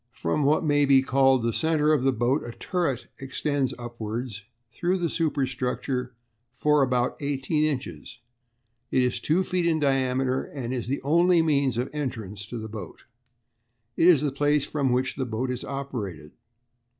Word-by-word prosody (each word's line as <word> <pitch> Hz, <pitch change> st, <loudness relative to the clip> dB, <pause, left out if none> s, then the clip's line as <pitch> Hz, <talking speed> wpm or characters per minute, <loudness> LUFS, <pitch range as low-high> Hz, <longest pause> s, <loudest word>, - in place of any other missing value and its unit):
"From 85 Hz, -, -1 dB
what 150 Hz, +3 st, +2 dB
may 145 Hz, -1 st, +3 dB
be 135 Hz, -1 st, +6 dB
called 135 Hz, -2 st, +3 dB
the 115 Hz, -1 st, 0 dB
centre 155 Hz, 0 st, +2 dB
of 150 Hz, -, +2 dB
the 135 Hz, +1 st, +3 dB
boat 125 Hz, +4 st, +1 dB
a 120 Hz, -, -7 dB
turret 165 Hz, -8 st, -2 dB
extends 135 Hz, 0 st, -1 dB
upwards 115 Hz, -2 st, -5 dB, 0.3 s
through 180 Hz, +5 st, 0 dB
the 170 Hz, -3 st, -1 dB
superstructure 130 Hz, -4 st, -2 dB, 0.4 s
for 150 Hz, +2 st, +3 dB
about 125 Hz, -2 st, +1 dB
eighteen 145 Hz, +2 st, 0 dB
inches. 120 Hz, -, -4 dB, 0.7 s
It 130 Hz, -, +2 dB
is 125 Hz, -1 st, 0 dB
two 170 Hz, +5 st, +1 dB
feet 180 Hz, -2 st, 0 dB
in 160 Hz, -2 st, +2 dB
diameter, 130 Hz, -2 st, +1 dB
and 130 Hz, -3 st, -5 dB
is 125 Hz, -3 st, -3 dB
the 135 Hz, +1 st, -2 dB
only 170 Hz, +3 st, +4 dB
means 140 Hz, -6 st, +1 dB
of 125 Hz, +2 st, 0 dB
entrance 110 Hz, -9 st, -5 dB
to 120 Hz, -, -6 dB
the 110 Hz, -1 st, -5 dB
boat. 105 Hz, -5 st, -9 dB, 0.9 s
It 165 Hz, -, +4 dB
is 165 Hz, -6 st, +6 dB
the 150 Hz, -2 st, 0 dB
place 145 Hz, +1 st, +1 dB
from 140 Hz, -4 st, 0 dB
which 130 Hz, +2 st, 0 dB
the 130 Hz, -, -1 dB
boat 120 Hz, +3 st, -2 dB
is 125 Hz, -, -4 dB
operated. 120 Hz, -, -5 dB
135 Hz, 165 wpm, -26 LUFS, 125-150 Hz, 0.9 s, be